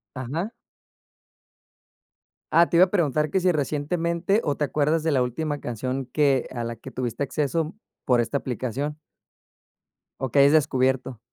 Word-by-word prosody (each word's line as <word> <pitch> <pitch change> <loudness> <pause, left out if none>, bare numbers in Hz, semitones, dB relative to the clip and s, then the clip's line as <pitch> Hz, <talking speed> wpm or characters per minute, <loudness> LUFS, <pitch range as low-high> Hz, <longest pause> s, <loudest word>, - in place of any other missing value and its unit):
Ajá. 150 - -3 2.0
Ah, 170 0 +5
te 170 - +2
iba 185 - +8
a 180 - -10
preguntar 155 -5 +1
que 190 - +1
si 180 0 +3
recientemente, 170 - 0
o 145 - 0
te - - -2
acuerdas 150 +2 +1
de 160 - +1
la 130 -3 +2
última 145 +4 -2
canción 130 +3 -3
que 135 0 +1
a 120 - -2
la 115 -1 -5
que 130 - -10
tuviste 125 +1 -3
acceso 150 +4 -1 0.3
por 125 -2 +4
esta 140 +4 -1
aplicación. 130 +4 -3 1.2
O 130 - -2
que 140 - +3
hayas 140 +2 +6
descubierto. 130 -4 +1
145 Hz, 155 wpm, -25 LUFS, 130-160 Hz, 2.0 s, iba